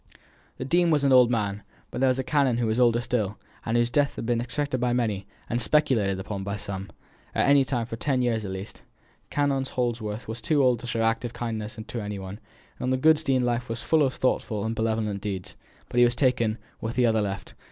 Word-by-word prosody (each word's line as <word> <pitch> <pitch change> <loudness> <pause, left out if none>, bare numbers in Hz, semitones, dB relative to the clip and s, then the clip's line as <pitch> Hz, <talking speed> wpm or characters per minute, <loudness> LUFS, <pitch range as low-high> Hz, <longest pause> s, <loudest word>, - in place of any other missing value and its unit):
The 130 - -4
dean 175 +4 +3
was 150 -3 +2
an 135 -1 +4
old 125 -2 +7
man, 105 -4 -1 0.3
but - - -4
there 135 - +4
was 130 0 +2
a 130 - -1
canon 135 -3 +2
who 120 - 0
was 110 +2 0
older 120 -1 +4
still, 110 -4 -1 0.3
and 115 +1 0
whose 120 0 +2
death 145 +2 +2
had - - -5
been 120 0 +1
expected 130 +2 -2
by 125 -1 +1
many, 105 -5 -1 0.2
and 120 +1 0
speculated 115 -9 +2
upon 95 0 -5
by 100 +1 -3
some, 100 -2 -6 0.5
any 140 -1 +5
time 125 -3 -1
for 115 0 -6
ten 130 0 0
years 115 -3 0
at 100 - -5
least. 95 +2 -7 0.5
Canon 140 -2 +1
Holdsworth 120 -4 -3
was 110 +1 -5
too 145 +5 +2
old 125 -3 +3
to 120 - -8
show 115 -1 -1
active 115 +1 0
kindness 110 -2 -4
to 120 - -4
any 105 -1 -4
one; 95 +2 -7 0.4
the 130 +1 0
good 155 +4 +5
dean's 135 -5 +1
life 120 0 -1
was 115 0 -4
full 160 -1 +3
of 135 -3 +1
thoughtful 110 -4 0
and 110 - -1
benevolent 110 -3 -1
deeds. 95 -3 -5 0.3
But 120 - 0
he - - +8
was 120 0 +3
taken, 120 -5 +1 0.2
and 110 - -2
the 125 -1 +3
other 110 -2 +3
left. 100 -1 -4
120 Hz, 225 wpm, -26 LUFS, 110-130 Hz, 0.5 s, he